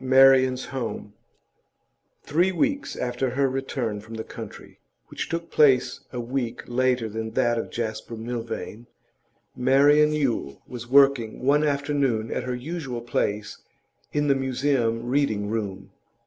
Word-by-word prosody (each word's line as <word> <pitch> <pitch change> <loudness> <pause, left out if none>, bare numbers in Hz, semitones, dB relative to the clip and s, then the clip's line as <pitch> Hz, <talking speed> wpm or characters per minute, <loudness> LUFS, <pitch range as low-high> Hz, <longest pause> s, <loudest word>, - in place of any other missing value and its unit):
MARIAN'S 130 -1 +5
HOME 120 -5 -5 1.1
Three 175 +6 +2
weeks 280 +9 -1
after 125 +1 -1
her 135 +2 +1
return 130 -5 -3
from 110 +2 -10
the 110 - -4
country - - -10 0.3
which - - -5
took 165 0 -4
place 135 -4 +4
a 125 - -4
week 120 0 -3
later 125 -1 +1
than 110 +1 -5
that 120 -1 +2
of - - -4
Jasper 115 0 -4
Milvain 115 0 -5 0.7
Marian 145 +4 +5
Yule 125 - -1
was 120 -1 -8
working 135 -4 +4
one 145 +2 +4
afternoon 140 -6 0
at 125 - -2
her 125 -1 -2
usual 135 -2 -5
place 105 -3 -2 0.5
in 145 0 0
the 140 - +5
Museum 130 -3 0
Reading 120 -6 0
room. 105 -4 -4
125 Hz, 135 wpm, -25 LUFS, 115-140 Hz, 1.1 s, MARIAN'S